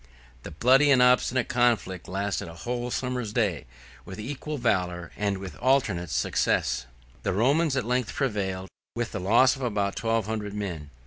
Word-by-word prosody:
The -, -, -8 dB
bloody 130 Hz, -, +4 dB
and 135 Hz, -2 st, +6 dB
obstinate 125 Hz, -1 st, +3 dB
conflict 115 Hz, -7 st, +1 dB
lasted 100 Hz, -1 st, -2 dB
a 80 Hz, -, -10 dB
whole 120 Hz, +6 st, -3 dB
summer's 125 Hz, -3 st, -2 dB
day, 100 Hz, -, 0 dB, 0.4 s
with 95 Hz, -, -9 dB
equal 145 Hz, +6 st, -5 dB
valor, 90 Hz, -8 st, -1 dB
and 100 Hz, -1 st, -1 dB
with 95 Hz, -5 st, -8 dB
alternate 105 Hz, -, +1 dB
success. 60 Hz, -3 st, 0 dB, 0.3 s
The -, -, -1 dB
Romans 140 Hz, -, +2 dB
at 125 Hz, -, -1 dB
length 125 Hz, -1 st, -1 dB
prevailed, 95 Hz, -8 st, -2 dB, 0.3 s
with 120 Hz, 0 st, -2 dB
the 105 Hz, -, -4 dB
loss 115 Hz, +8 st, +4 dB
of 135 Hz, -, -10 dB
about 105 Hz, -5 st, -1 dB
twelve 115 Hz, -2 st, 0 dB
hundred 105 Hz, -2 st, -4 dB
men. 85 Hz, -8 st, -5 dB
110 Hz, 165 wpm, -26 LUFS, 95-125 Hz, 0.4 s, and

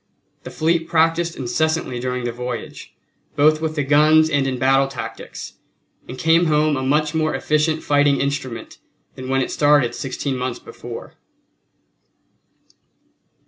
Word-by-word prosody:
The -, -, -9 dB
fleet 165 Hz, +1 st, 0 dB
practiced 165 Hz, +1 st, +1 dB
incessantly 140 Hz, 0 st, -1 dB
during 125 Hz, 0 st, -3 dB
the 120 Hz, -, -2 dB
voyage, 125 Hz, +1 st, -7 dB, 0.4 s
both 155 Hz, +2 st, +4 dB
with 160 Hz, -1 st, -2 dB
the 145 Hz, -, 0 dB
guns 155 Hz, +3 st, +4 dB
and 140 Hz, -2 st, +1 dB
in 130 Hz, -1 st, -2 dB
battle 135 Hz, +1 st, +3 dB
tactics, 135 Hz, -, -8 dB, 0.5 s
and 130 Hz, -, -7 dB
came 165 Hz, +4 st, +3 dB
home 150 Hz, -1 st, +2 dB
a 130 Hz, -, -2 dB
much 150 Hz, +3 st, +1 dB
more 155 Hz, -1 st, 0 dB
efficient 155 Hz, +1 st, 0 dB
fighting 145 Hz, -1 st, +3 dB
instrument 135 Hz, -4 st, -4 dB, 0.3 s
than 130 Hz, 0 st, -8 dB
when 135 Hz, 0 st, +1 dB
it -, -, -2 dB
started 145 Hz, -4 st, +3 dB
sixteen 135 Hz, 0 st, -3 dB
months 125 Hz, -1 st, -3 dB
before. -, -, -10 dB
145 Hz, 140 wpm, -20 LUFS, 130-155 Hz, 0.5 s, both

